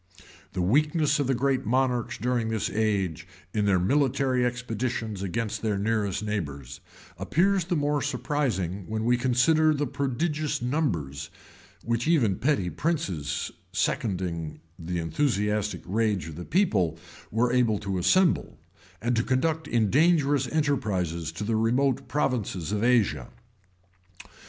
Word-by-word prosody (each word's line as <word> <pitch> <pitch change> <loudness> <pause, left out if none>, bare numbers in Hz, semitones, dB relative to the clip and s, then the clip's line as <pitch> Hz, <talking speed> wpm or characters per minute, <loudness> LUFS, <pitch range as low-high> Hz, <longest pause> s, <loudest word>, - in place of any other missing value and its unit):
The 90 - -1
weakness 150 - +2
of 140 - 0
the 135 - +2
greatest 130 -1 0
monarchs 125 -1 +1
during 120 -2 0
this 110 -2 -1
age, 95 -7 -1 0.3
in 105 -2 +1
their 100 -2 +4
military 130 +5 +2
expeditions 120 -3 -2
against 100 +3 -2
their 105 -3 0
nearest 105 -1 0
neighbors, 70 -11 -4 0.4
appears 190 +1 +2
the 175 - -1
more 145 -1 +1
surprising, 120 - -1
when 110 0 -2
we 120 +1 +4
consider 150 +6 +3
the 145 0 0
prodigious 145 +3 -1
numbers, 120 - -2 0.5
which 115 +3 -1
even 120 - +3
petty 125 -11 +1
princes, 150 - -2 0.2
seconding 85 -7 -2 0.2
the 85 +2 -3
enthusiastic 105 - 0
rage 105 -4 0
of 80 - -8
the 85 +2 -7
people, 100 - +1 0.3
were 120 +3 +1
able 120 -4 +3
to 100 -2 -3
assemble, 175 - +2 0.5
and 120 +1 +1
to 115 - +2
conduct 155 +6 0
in 115 -7 +1
dangerous 145 -3 +3
enterprises 100 - -1
to 90 +6 -6
the 110 +2 0
remote 130 +4 +1
provinces 115 - -1
of 105 +1 -1
Asia. 110 - +2
115 Hz, 130 wpm, -27 LUFS, 100-140 Hz, 0.5 s, their